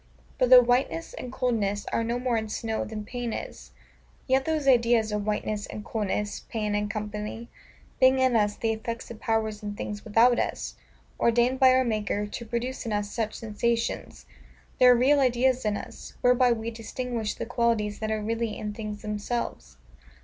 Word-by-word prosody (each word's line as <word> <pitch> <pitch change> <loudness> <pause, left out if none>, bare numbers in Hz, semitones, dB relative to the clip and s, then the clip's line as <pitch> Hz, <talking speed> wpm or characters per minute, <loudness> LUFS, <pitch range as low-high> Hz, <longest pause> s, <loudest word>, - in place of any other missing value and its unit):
But, 250 - +3
though 250 -1 +10
whiteness 240 -10 0
and 250 - -7
coldness 215 -6 -1
are 230 - +1
no 235 +1 -1
more 245 -1 0
in 220 -1 -2
snow 220 +1 -2
than 215 -1 -6
pain 245 +1 -4
is; - - -7 0.6
yet 265 0 +2
those 310 -3 -1
ideas 235 -3 +4
of 210 0 -2
whiteness 210 0 -2
and 210 - -8
coldness, 210 -1 -2
pain, 210 -2 -2
&c., 210 +2 -4 0.5
being 260 0 +6
in 260 -2 +3
us 210 -2 +2
the 225 - -1
effects 230 +2 -5
of 225 - -9
powers 220 -2 -1
in 205 -1 -5
things 205 0 -5
without 230 +3 +4
us, - - -2 0.5
ordained 240 +2 +3
by 260 - +7
our 260 0 +4
Maker 210 -3 -1
to 220 +3 -7
produce 240 +3 -3
in - - -2
us 205 0 -2
such 220 -2 -2
sensations; 230 +1 -2 0.5
they 255 - +7
are 250 - +8
real 270 +4 +4
ideas 255 -1 +2
in 210 -1 +1
us, - - -9
whereby 250 0 +4
we 230 0 -2
distinguish 230 0 -4
the - - -4
qualities 230 -4 0
that 220 - -2
are 215 -1 -1
really 225 0 -2
in 210 0 -4
things 210 0 -6
themselves. 210 - -4
225 Hz, 180 wpm, -27 LUFS, 210-245 Hz, 0.6 s, though